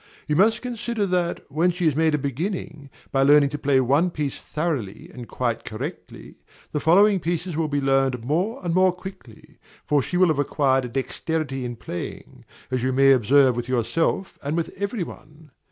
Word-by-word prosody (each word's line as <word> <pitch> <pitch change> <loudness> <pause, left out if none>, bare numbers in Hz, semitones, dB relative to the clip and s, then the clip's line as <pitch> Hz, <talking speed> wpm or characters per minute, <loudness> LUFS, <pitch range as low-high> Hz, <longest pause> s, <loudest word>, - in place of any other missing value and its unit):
You 150 - 0
must 220 +8 +3
consider 235 -3 -2
that, 180 -2 -1
when 165 +5 +2
she 180 0 -2
has 155 -4 +3
made 160 0 +2
a - - +1
beginning, 150 - -4 0.2
by 135 - +2
learning 145 +1 +5
to 145 +1 -5
play 140 -1 +2
one 140 +8 +2
piece 150 -5 -4
thoroughly 150 - -4
and 120 -2 -9
quite 120 -3 -2
correctly, 110 - -8 0.3
the 150 - -1
following 195 +6 +4
pieces 175 0 -3
will 160 0 0
be 145 -1 -1
learned 135 -3 +1
more 185 - -1
and 170 - 0
more 185 +1 +4
quickly; 180 - -12 0.3
for 145 -1 +2
she 180 - -3
will 185 -1 +5
have 155 -3 0
acquired 135 -2 +1
a - - -6
dexterity 135 +2 -3
in 120 0 -5
playing, 90 -6 -8 0.3
as 130 -1 0
you 130 +2 0
may 135 +1 +5
observe 130 +1 +4
with 120 +1 -4
yourself 165 - -1
and 145 +3 -2
with 165 - -2
every 200 -1 -1
one. 150 -1 -13
150 Hz, 185 wpm, -23 LUFS, 135-175 Hz, 0.3 s, learning